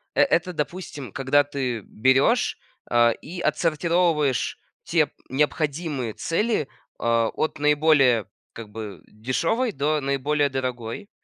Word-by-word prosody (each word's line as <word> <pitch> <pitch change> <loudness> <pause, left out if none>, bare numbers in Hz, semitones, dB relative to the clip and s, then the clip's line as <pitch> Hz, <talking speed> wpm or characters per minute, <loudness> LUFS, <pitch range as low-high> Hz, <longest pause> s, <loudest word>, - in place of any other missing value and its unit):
э - - +4
это, 180 -8 +2
допустим, 150 - -5
когда 135 +2 +3
ты 130 -6 -3
берешь, 130 - +2 0.3
а, 120 0 +5
и 175 +9 -8
отсортировываешь 165 -4 +1 0.2
те - - +2 0.2
необходимые 145 -3 -1
цели, 210 - 0 0.3
а, 115 -1 +2
от 155 0 -2
наиболее, 145 -6 +4 0.3
как 115 -2 -9
бы, 105 -5 -8
дешевой 165 - -1
до 150 0 0
наиболее 140 +1 0
дорогой. 130 - -4
140 Hz, 110 wpm, -24 LUFS, 125-160 Hz, 0.3 s, а